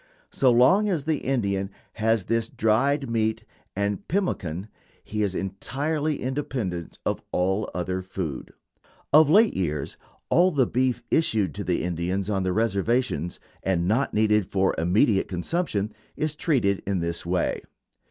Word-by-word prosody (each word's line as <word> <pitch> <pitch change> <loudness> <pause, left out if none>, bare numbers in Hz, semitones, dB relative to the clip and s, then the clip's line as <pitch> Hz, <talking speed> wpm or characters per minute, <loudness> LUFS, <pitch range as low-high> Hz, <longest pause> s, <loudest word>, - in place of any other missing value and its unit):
So 130 -2 +3
long 185 - +5
as 170 -7 0
the 155 -1 0
Indian 100 -7 -1 0.2
has 110 -2 +1
this 115 -1 0
dried 135 +6 +1
meat 110 -1 0 0.3
and 100 0 -2
pemmican 100 - -2 0.4
he 105 0 -3
is 100 -3 0
entirely 145 +10 -2
independent 125 - -3
of - - -1
all 95 +4 0
other 90 +1 -2
food. 90 -6 -5 0.6
Of 155 0 +7
late 215 +7 +5
years 75 -6 -2 0.3
all 180 +2 +5
the 140 -7 +2
beef 125 -1 0
issued 110 - +2
to 100 - -5
the 90 -1 0
Indians 90 +3 -2
on 95 -2 0
the 95 0 0
reservations, 105 - 0 0.2
and 90 -2 0
not 120 +8 +1
needed 105 -2 +2
for 95 -1 +1
immediate 95 - +3
consumption, 105 - -2 0.2
is 155 -1 -1
treated 125 - +1
in 100 -1 +1
this 85 -1 -2
way. 90 +1 -1
105 Hz, 140 wpm, -25 LUFS, 95-135 Hz, 0.6 s, Of